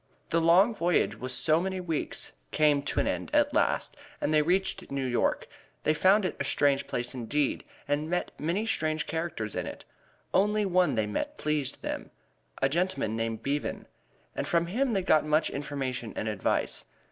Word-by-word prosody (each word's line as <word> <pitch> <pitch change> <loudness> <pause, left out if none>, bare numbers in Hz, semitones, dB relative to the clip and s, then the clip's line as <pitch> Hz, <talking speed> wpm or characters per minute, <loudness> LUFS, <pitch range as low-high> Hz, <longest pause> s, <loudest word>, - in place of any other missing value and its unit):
The 165 - +3
long 180 +8 +5
voyage 175 -4 +2
of 130 0 -6
so 155 +5 +3
many 190 0 -2
weeks 165 -4 -3 0.2
came 150 -2 +3
to 140 - -2
an - - +2
end - - -2
at - - +3
last, - - +1 0.2
and 155 - 0
they 155 - +5
reached 185 +5 0
New 135 -1 -2
York. 125 -2 0 0.4
They 155 - +3
found 190 +5 +4
it - - -1
a - - 0
strange 140 0 +2
place 120 +1 -3
indeed, 130 +4 -1 0.2
and 145 +2 0
met 180 +1 -1
many 175 +8 0
strange 155 -8 0
characters 160 -11 -3
in - - -2
it. - - -8 0.5
Only 210 +2 +3
one 180 -7 +3
they 110 -1 +1
met 290 - -3
pleased 150 -3 -1
them: - - -4 0.5
a - - +6
gentleman 170 - 0
named 115 -1 -2
Bevan, 145 +1 -2 0.5
and - - -2
from 170 0 +2
him 240 +8 0
they 195 -2 +1
got 155 -4 +4
much 155 +1 +2
information 135 -4 -3
and 110 - -3
advice. 105 -3 -1
155 Hz, 180 wpm, -29 LUFS, 135-180 Hz, 0.5 s, a